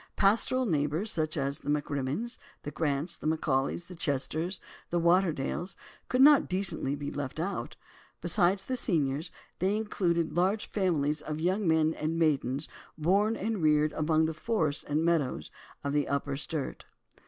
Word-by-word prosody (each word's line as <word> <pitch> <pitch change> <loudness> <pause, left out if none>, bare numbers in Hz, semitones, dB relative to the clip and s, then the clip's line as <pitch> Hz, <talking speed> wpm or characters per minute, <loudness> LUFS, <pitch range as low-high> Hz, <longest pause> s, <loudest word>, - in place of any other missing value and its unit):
Pastoral 230 +6 +3
neighbours, 155 +3 0
such 155 0 -1
as 140 +1 -1
the - - -7
MacRimmons, 145 - -2 0.2
the 145 - -5
Grants, 150 +2 -1
the - - -5
MacAulays, 155 0 0
the 180 - -10
Chesters, 160 +3 -1 0.3
the 175 - +1
Waterdales, 170 -1 +1 0.3
could 255 +1 +4
not 290 -1 +7
decently 175 -7 0
be 145 0 -5
left 145 +1 -4
out. 195 +5 -3 0.4
Besides 190 0 +2
the 255 - -2
seniors, 155 - 0 0.3
they 195 +3 +2
included 170 -7 0
large 190 +5 +2
families 155 -7 +1
of 155 0 -4
young 185 +4 +1
men 160 0 +3
and 160 +1 -2
maidens 145 -3 +1 0.3
born 200 +8 +2
and 220 -2 -2
reared 150 -1 +3
among 155 0 +2
the 160 - -1
forests 160 -5 -1
and 150 +2 0
meadows 165 -6 0 0.3
of 140 0 -1
the 145 -1 +1
Upper 140 0 -1
Sturt. 150 0 -4
160 Hz, 155 wpm, -30 LUFS, 145-190 Hz, 0.4 s, not